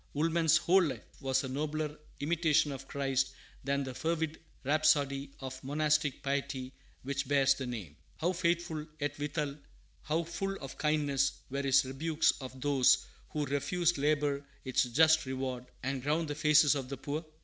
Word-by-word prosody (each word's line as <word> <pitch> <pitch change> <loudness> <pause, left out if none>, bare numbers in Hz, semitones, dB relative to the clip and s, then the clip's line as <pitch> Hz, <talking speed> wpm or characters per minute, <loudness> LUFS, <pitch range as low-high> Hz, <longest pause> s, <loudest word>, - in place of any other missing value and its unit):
Woolman's 160 +1 +3
whole 180 +4 +4
life 135 - -2 0.2
was 130 0 +1
a - - -3
nobler 150 +2 -2 0.3
Imitation 155 -1 +2
of 135 0 -7
Christ 135 -1 0 0.3
than 140 +1 0
that 130 -1 -5
fervid 160 -1 -1 0.2
rhapsody 145 -1 +2
of 130 0 -7
monastic 150 0 +1
piety 135 -2 -2 0.3
which 135 +1 -2
bears 140 -1 +4
the 135 -1 -5
name. 105 -12 -6 0.2
How 175 +3 0
faithful, 170 -3 -1
yet, 145 0 -3
withal, 150 -1 -2 0.4
how 160 +3 0
full 170 +4 -3
of 135 -1 -9
kindness, 145 -3 +2 0.2
were 140 +1 -1
his 135 -1 +4
rebukes 155 +4 +1
of 130 0 -8
those 135 -1 +4 0.2
who 150 -1 -2
refused 165 +4 0
labor 145 -1 +1 0.2
its 130 0 +2
just 160 +4 +4
reward, 130 -1 -3 0.2
and 135 0 -2
ground 150 +4 0
the - - -1
faces 150 0 +5
of 135 -3 -4
the 140 - -4
poor? 150 +5 -4
145 Hz, 160 wpm, -32 LUFS, 135-155 Hz, 0.4 s, faces